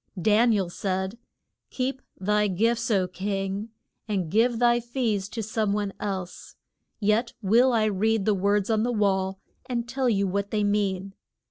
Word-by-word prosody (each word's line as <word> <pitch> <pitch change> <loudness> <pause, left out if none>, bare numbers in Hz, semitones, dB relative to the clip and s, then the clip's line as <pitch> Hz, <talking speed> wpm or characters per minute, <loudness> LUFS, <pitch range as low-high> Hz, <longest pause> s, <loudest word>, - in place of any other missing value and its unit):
Dan 220 +5 +4
i - - +3
el 185 -3 -2
said, 190 +4 -3 0.5
Keep 265 +1 -2 0.2
thy 210 +2 +2
gifts, 230 +5 +1
O 195 -4 +2
king, 195 +3 -3 0.4
and 190 -7 -2
give 230 +3 +3
thy 240 0 +4
fees 230 -5 -2
to 225 0 -4
some 215 -1 0
one 205 -1 -2
else. 190 -3 -5 0.4
Yet 220 +3 +1
will 235 +6 +4
I 225 -2 +2
read 215 0 +1
the 215 - +3
words 200 +2 +1
on 215 -1 +2
the 245 +2 0
wall 195 -3 +1 0.3
and 240 -2 -2
tell 260 0 0
you 200 -3 +2
what 200 +1 -1
they 210 -1 0
mean. 195 -2 0
210 Hz, 165 wpm, -26 LUFS, 195-230 Hz, 0.5 s, Dan